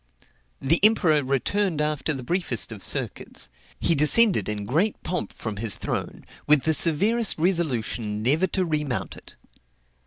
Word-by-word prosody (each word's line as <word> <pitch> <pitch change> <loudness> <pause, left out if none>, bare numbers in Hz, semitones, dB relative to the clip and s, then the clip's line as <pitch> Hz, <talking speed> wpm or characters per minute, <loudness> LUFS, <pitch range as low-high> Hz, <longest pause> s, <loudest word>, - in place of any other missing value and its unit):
The 160 +5 +3
emperor 180 -8 +4
returned 155 +7 -1
after 150 +1 -1
the 135 -4 -4
briefest 130 - -1
of - - -8
circuits; - - -1 0.3
he - - +1
descended 175 - +3
in 105 -1 -4
great 165 - 0
pomp 180 - -4
from 110 -2 -7
his 110 -2 +4
throne, - - -5 0.2
with 150 -2 +4
the 160 - +1
severest 205 +9 +2
resolution 125 - -1
never 155 +10 +1
to 185 0 -1
remount 150 -6 -3
it. - - -15
155 Hz, 145 wpm, -24 LUFS, 125-180 Hz, 0.3 s, emperor